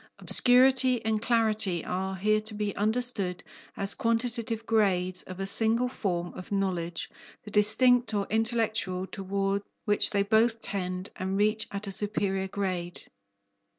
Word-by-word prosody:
Obscurity 255 -1 +4
and 220 -1 0
clarity 215 -7 +1
are 190 +1 -3
here 215 +3 +1
to 215 0 -6
be 210 -1 -3
understood 215 -4 0 0.3
as 195 0 +1
quantitative 230 -1 -2
grades 185 -5 +1
of 185 0 -10
a 195 - -2
single 225 +4 +2
form 175 -8 -3
of 185 - -10
knowledge, 180 -4 -2 0.4
the 210 - -11
distinct 240 +4 +3
or 205 -2 -1
intellectual, 220 -4 0
toward 195 +1 -2 0.2
which 205 -1 +4
they 200 -1 +1
both 225 +2 +2
tend 185 -2 -3
and 190 +1 -3
reach 215 +2 +2
at 200 0 -6
a 200 - -5
superior 195 -1 -1
grade. 185 -3 -5
205 Hz, 140 wpm, -27 LUFS, 190-225 Hz, 0.4 s, Obscurity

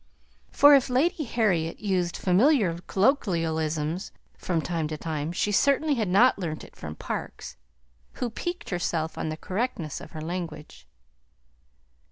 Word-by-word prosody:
For 290 0 +7
if 275 -2 +4
Lady 300 +5 +1
Harriet 185 -9 0
used 185 -4 -1
familiar 195 - +3
colloquialisms 165 - 0 0.2
from 175 -3 -1
time 165 -1 -2
to 155 0 -5
time, 155 0 -3
she 205 +4 0
certainly 280 +7 +3
had 225 -6 0
not 200 +6 +4
learnt 160 -4 -4
it - - -14
from 75 0 -7
Parkes, - - -6 0.6
who 245 -3 -3
piqued 350 - -5
herself 165 -3 -1
on - - -3
the 155 - -4
correctness 190 - -3
of - - -12
her 155 - -6
language. 155 - -6
180 Hz, 140 wpm, -26 LUFS, 160-240 Hz, 0.6 s, For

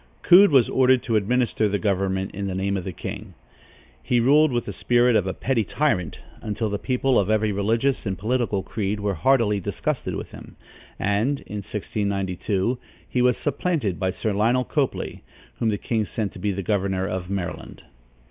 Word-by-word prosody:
Coode 190 +3 +8
was 135 -6 +5
ordered 130 -1 +3
to 115 - -1
administer 110 0 +1
the 100 - 0
government 95 -2 -1
in 100 0 -4
the 95 - -3
name 100 +1 -1
of 95 -3 -3
the 95 - -3
king. 100 +2 -7 0.7
He 120 - +1
ruled 145 +5 +4
with 120 -1 -1
the 100 - -5
spirit 120 +3 +3
of 100 -3 +2
a 95 - -1
petty 125 -4 0
tyrant, 95 - -1 0.2
until 110 0 -2
the 100 - -2
people 130 0 +1
of 100 - 0
every 110 0 +2
religious 115 +7 0
and 95 -1 -2
political 110 -1 -1
creed 105 +2 -3
were 100 -1 -1
heartily 115 -3 +2
disgusted 95 - -3
with - - -6
him, - - -12 0.4
and, 105 +8 0
in 105 - -7
1692, 100 +2 -2 0.3
he 125 - 0
was 125 0 +3
supplanted 145 - -1
by 95 -1 0
Sir 105 +3 -2
Lionel 115 +5 +2
Copley, - - -2 0.4
whom 115 - +1
the 105 - 0
king 110 +1 -1
sent 105 -1 -3
to - - -11
be 105 - 0
governor 95 -2 0
of 95 -1 -4
Maryland. 95 -2 -5
105 Hz, 180 wpm, -24 LUFS, 95-125 Hz, 0.7 s, Coode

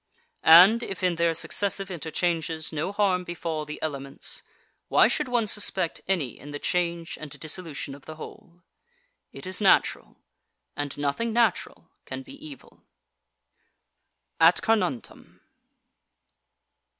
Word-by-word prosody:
And, 185 +8 +8
if 195 -5 -6
in 180 -2 +1
their 170 -1 +2
successive 195 +3 0
interchanges 165 -1 -2
no 155 +5 -2
harm 195 -3 +1
befall 165 -3 -4
the 150 0 -7
elements, 140 -3 -4 0.5
why - - +5
should 300 - -1
one 240 -3 +1
suspect 195 -4 0
any 170 -10 -1
in 145 - -11
the 145 - -5
change 170 +1 -2
and 155 - -7
dissolution 155 -2 -5
of 140 0 -14
the 155 - -7
whole? 170 +2 -12 0.7
It - - -8
is 185 +2 -4
natural, 195 - +2 0.6
and 145 -1 -5
nothing 145 +11 -1
natural 235 -1 0
can 270 - -6
be 275 - -12
evil. 300 -3 -12 1.6
AT - - +5
CARNUNTUM. 185 - -2
170 Hz, 125 wpm, -26 LUFS, 155-195 Hz, 1.6 s, And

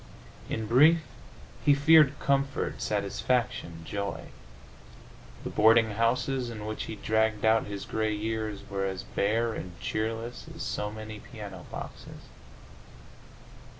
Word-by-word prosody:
In 110 - -2
brief, 150 +9 +6 0.6
he 145 - +6
feared 150 0 +6
comfort, 140 0 0
satisfaction, 100 -4 -1
joy. 100 +2 -4 1.1
The - - -4
boarding 110 +1 +5
houses 125 +3 0
in 105 -2 -6
which 110 0 -4
he 110 - -6
dragged 110 +1 +1
out 110 0 +4
his 100 -1 -5
gray 110 -1 -1
years 110 -1 -3
were 95 -1 -1
as 95 -1 -4
bare 115 +3 0
and 90 -4 -7
cheerless 115 +2 -3
as - - -5
so 105 - -2
many 110 0 -8
piano 100 -6 -9
boxes. - - -9
110 Hz, 120 wpm, -29 LUFS, 105-120 Hz, 1.1 s, brief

